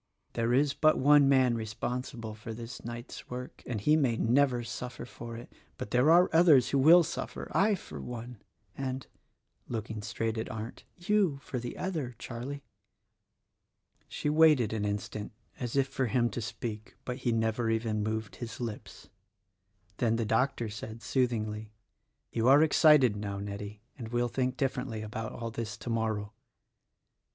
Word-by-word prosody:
There 115 0 0
is 140 +3 +3
but 155 +2 +4
one 145 0 +6
man 130 -3 +4
responsible 115 +1 -4
for 110 +1 -8
this 115 +1 -8
night's 120 +1 -8
work 125 +1 -7
— - - -35
and 115 -3 -2
he 150 +10 +4
may 130 -7 +2
never 125 +1 +3
suffer 125 +1 -6
for 115 -1 -8
it. 120 - -11 0.2
But 125 -4 -6
there 125 +5 +4
are 175 +2 +7
others 155 -7 +6
who 140 - +2
will 165 +6 +8
suffer: - - -5
I 205 +2 +4
for 75 - -9
one, 120 - -7 0.3
and," 130 -1 -4 0.6
looking 110 -2 -4
straight 115 +2 -2
at 110 - -4
Arndt, 110 +1 -7
"you, 185 -4 +2
for 125 - -4
the 120 0 -6
other, 155 -10 -3
Charlie." 130 +5 -6 1.4
She - - -4
waited 150 -7 +5
an 105 -2 -1
instant 105 +1 -4 0.3
as 120 -1 -3
if 135 -1 +3
for 135 -1 -1
him 120 0 +1
to 120 - -4
speak; 110 -1 -6
but 125 0 -3
he 125 -3 -1
never 115 0 0
even 110 -1 0
moved 110 0 -3
his 115 -3 -7
lips. 115 -4 -7 0.9
Then 115 -2 +2
the 115 -1 0
doctor 115 +1 +1
said, 110 +2 -8
sooth 130 -2 +2
ingly, 110 -2 -4 0.6
"You 115 +1 +1
are 140 +3 +7
excited 150 -7 +5
now, 100 -1 -4
Nettie, 100 +1 -6 0.2
and 115 - -5
will 120 +1 0
think 130 +2 -1
differ 135 0 0
ently 115 -4 -5
about 110 +1 -5
all 115 -1 -5
this 110 -2 -5
tomorrow." 110 -3 -2
120 Hz, 165 wpm, -30 LUFS, 110-135 Hz, 1.4 s, will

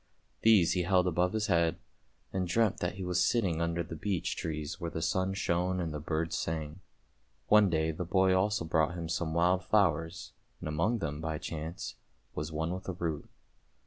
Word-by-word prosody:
These 105 -7 +5
he 90 - +1
held 90 +1 +3
above 90 +1 +1
his 110 -1 0
head, 85 -3 +2 0.6
and 95 -1 -1
dreamt 105 +3 +2
that 90 - -2
he 95 - -5
was 90 -1 +1
sitting 95 -9 +1
under 85 0 0
the 85 - -7
beech 95 0 -2
trees 80 +2 -4
where 85 - -2
the 80 - -4
sun 95 +3 0
shone 90 0 0
and 85 -3 -2
the 75 - -3
birds 80 +2 -2
sang. 80 +1 -3 0.7
One 105 -2 +6
day 80 -1 +1
the 80 +3 -4
boy 95 +2 +3
also 95 0 +1
brought 80 +1 +1
him 85 -2 -4
some 80 -1 -2
wild 90 +2 +3
flowers, 85 -4 +1 0.3
and - - -6
among 85 +10 +1
them, 75 -7 -4
by 80 -1 -2
chance, 80 0 -6 0.4
was 75 +2 -4
one 80 +2 -2
with 95 +1 -6
a - - -1
root. 85 -4 -3
85 Hz, 190 wpm, -31 LUFS, 80-95 Hz, 0.7 s, One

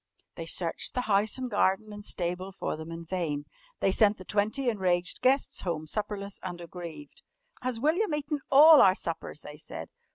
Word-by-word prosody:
_" - - -54
They - - -6
searched - - -2
the 250 - +1
house 210 -1 +1
and 260 -1 -3
garden 205 -1 +1
and 205 0 -9
stable 180 0 -2
for 190 - -3
them 160 +1 -8
in 165 0 -7
vain. 160 -5 -2 0.4
They 195 - +3
sent 210 +1 +4
the 185 - -11
twenty 215 +8 0
enraged 180 -5 +1
guests 265 +2 +2
home 165 -4 -3
supperless 200 +2 -4
and 175 -2 -6
aggrieved. 175 - -9 0.4
"Has 250 -2 -2
William 315 - +1
eaten 295 0 -3
all 300 +2 +9
our 190 -1 +6
suppers?" 165 -4 -4
they 150 0 -10
said. 150 - -8
195 Hz, 185 wpm, -29 LUFS, 175-250 Hz, 0.4 s, all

